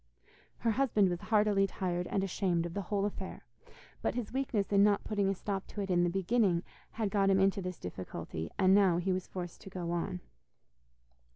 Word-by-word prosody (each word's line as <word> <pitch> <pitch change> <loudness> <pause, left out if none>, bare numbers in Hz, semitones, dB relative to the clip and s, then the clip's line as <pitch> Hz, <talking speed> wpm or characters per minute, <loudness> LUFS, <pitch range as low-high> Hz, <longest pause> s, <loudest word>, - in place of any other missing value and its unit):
Her 230 - +1
husband 215 -5 +3
was 175 -1 -3
heartily 210 -2 +3
tired 180 -2 -2
and 195 - 0
ashamed 180 -3 0
of 170 - -5
the 200 - -2
whole 200 +1 -1
affair, 195 -2 -5 0.6
but - - -1
his 245 -2 -4
weakness 255 -7 -1
in 200 -1 +5
not 205 -1 +3
putting 205 -2 0
a 195 - 0
stop 195 0 -4
to 205 - -5
it 195 -1 -2
in 175 -1 +3
the 175 - +2
beginning 190 -1 +2 0.3
had 220 -3 -1
got 195 -1 +3
him 195 0 +4
into 195 +1 +3
this 180 -2 -5
difficulty, 85 -2 -6
and 190 0 +5
now 195 -4 +5
he 185 +2 0
was 185 -1 -3
forced 175 -2 -7
to 195 - -10
go 180 -2 -4
on. 170 - -2
195 Hz, 200 wpm, -32 LUFS, 175-205 Hz, 0.6 s, in